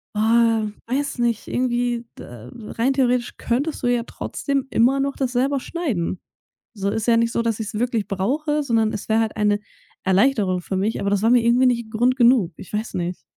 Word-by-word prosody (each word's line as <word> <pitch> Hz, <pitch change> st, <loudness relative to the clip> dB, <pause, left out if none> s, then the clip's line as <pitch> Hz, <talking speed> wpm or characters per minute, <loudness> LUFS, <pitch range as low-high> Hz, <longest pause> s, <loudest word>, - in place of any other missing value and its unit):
„oh, 225 Hz, 0 st, +3 dB, 0.2 s
weiß 275 Hz, +4 st, -2 dB
nicht. 235 Hz, -2 st, 0 dB
Irgendwie, 240 Hz, -1 st, -1 dB
äh, 120 Hz, 0 st, -10 dB, 0.3 s
rein 260 Hz, +4 st, +2 dB
theoretisch 250 Hz, -2 st, +1 dB
könntest 280 Hz, +7 st, -2 dB
du 245 Hz, -, 0 dB
ja 240 Hz, -1 st, +1 dB
trotzdem 275 Hz, +2 st, -3 dB
immer 260 Hz, +4 st, +3 dB
noch 275 Hz, 0 st, -1 dB
das 260 Hz, -3 st, -1 dB
selber 270 Hz, +2 st, +1 dB
schneiden“. 245 Hz, -, -3 dB, 0.6 s
So 200 Hz, -1 st, -1 dB
ist 220 Hz, +2 st, -2 dB
ja 230 Hz, -1 st, +5 dB
nicht 230 Hz, 0 st, +1 dB
so, -, -, +1 dB
dass 230 Hz, -1 st, -1 dB
ich's 215 Hz, -, -5 dB
wirklich 230 Hz, -1 st, -1 dB
brauche, 295 Hz, +11 st, -1 dB
sondern 225 Hz, -4 st, +1 dB
es 210 Hz, -, -6 dB
wäre 220 Hz, -, +3 dB
halt 220 Hz, -, -2 dB
eine 205 Hz, -1 st, +2 dB, 0.4 s
Erleichterung 190 Hz, -2 st, +2 dB
für 190 Hz, -, -4 dB
mich, 210 Hz, +4 st, -1 dB
aber 200 Hz, -, 0 dB
das 205 Hz, -1 st, +1 dB
war 225 Hz, -, +4 dB
mir 245 Hz, -2 st, +5 dB
irgendwie 245 Hz, +2 st, +4 dB
nicht 235 Hz, -2 st, 0 dB
'n -, -, -17 dB
Grund 245 Hz, +3 st, +2 dB
genug. 235 Hz, -8 st, +4 dB
Ich -, -, -11 dB
weiß 215 Hz, +2 st, -3 dB
nicht. 175 Hz, 0 st, -3 dB
235 Hz, 200 wpm, -22 LUFS, 210-255 Hz, 0.6 s, ja